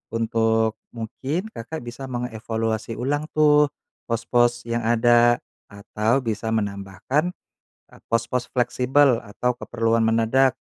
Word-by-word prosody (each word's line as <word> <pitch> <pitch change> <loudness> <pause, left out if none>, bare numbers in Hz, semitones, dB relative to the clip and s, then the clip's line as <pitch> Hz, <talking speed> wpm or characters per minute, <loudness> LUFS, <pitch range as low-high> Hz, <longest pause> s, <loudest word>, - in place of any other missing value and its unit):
untuk 115 -1 +1 0.2
mungkin 140 - -4
Kakak 125 - -7
bisa 120 +3 -7
mengevaluasi 115 -2 -3
ulang 145 +4 -2
tuh 150 -1 +5 0.4
pos-pos 120 +1 +1
yang 115 0 -2
ada 120 0 +4 0.3
atau 105 +5 -1
bisa 110 0 -2
menambahkan, 105 - -2 0.6
e - - -16
pos-pos 115 +2 -1
fleksibel 125 +1 +2
atau 120 +4 -2
keperluan 115 -1 0
mendadak, 115 +4 +3
120 Hz, 105 wpm, -23 LUFS, 115-125 Hz, 0.6 s, tuh